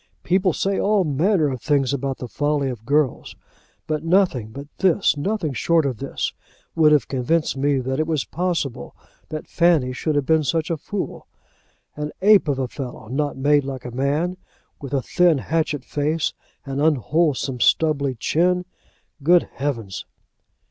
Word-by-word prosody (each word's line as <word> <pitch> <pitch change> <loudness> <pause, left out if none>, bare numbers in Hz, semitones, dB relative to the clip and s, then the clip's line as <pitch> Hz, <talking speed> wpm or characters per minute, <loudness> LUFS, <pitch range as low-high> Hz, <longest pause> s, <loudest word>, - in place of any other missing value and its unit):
People 185 +1 +2
say 195 +4 -1
all 205 -1 +2
manner 160 +3 +2
of 130 -3 -5
things 140 -3 +1
about 135 -1 -2
the 125 - -6
folly 145 +1 0
of 115 -2 -10
girls; 145 -2 0 0.5
but 155 -1 -2
nothing 165 - +2
but 140 +6 -8
this, 190 -1 +3
nothing 165 0 -2
short 165 +3 +2
of 130 -4 -2
this, 135 +3 -3 0.4
would 155 -2 +4
have 150 -2 +3
convinced 145 +5 0
me 140 +1 +1
that 130 +2 -2
it 155 - 0
was 155 -4 0
possible 170 -6 -3 0.3
that 155 -1 -6
Fanny 165 -7 +2
should 155 +4 -2
have 145 -2 +1
been 160 +1 +3
such 165 +4 -1
a 165 - 0
fool. 195 +6 -5 0.7
An 150 0 -4
ape 205 -4 +6
of 140 -2 0
a 130 -1 -1
fellow, 125 -4 -8
not 145 +2 -2
made 145 +1 +3
like 130 -2 -6
a 125 - -5
man, 145 +8 -1 0.4
with 140 -2 -7
a 135 - 0
thin 175 -4 +3
hatchet 150 -1 -1
face, 150 +2 -1 0.3
and 135 0 -3
unwholesome 150 -2 +1
stubbly 140 +2 +2
chin. 180 +9 +1 0.6
Good 175 +4 +4
heavens!" 115 -9 -4
145 Hz, 160 wpm, -22 LUFS, 135-165 Hz, 0.7 s, ape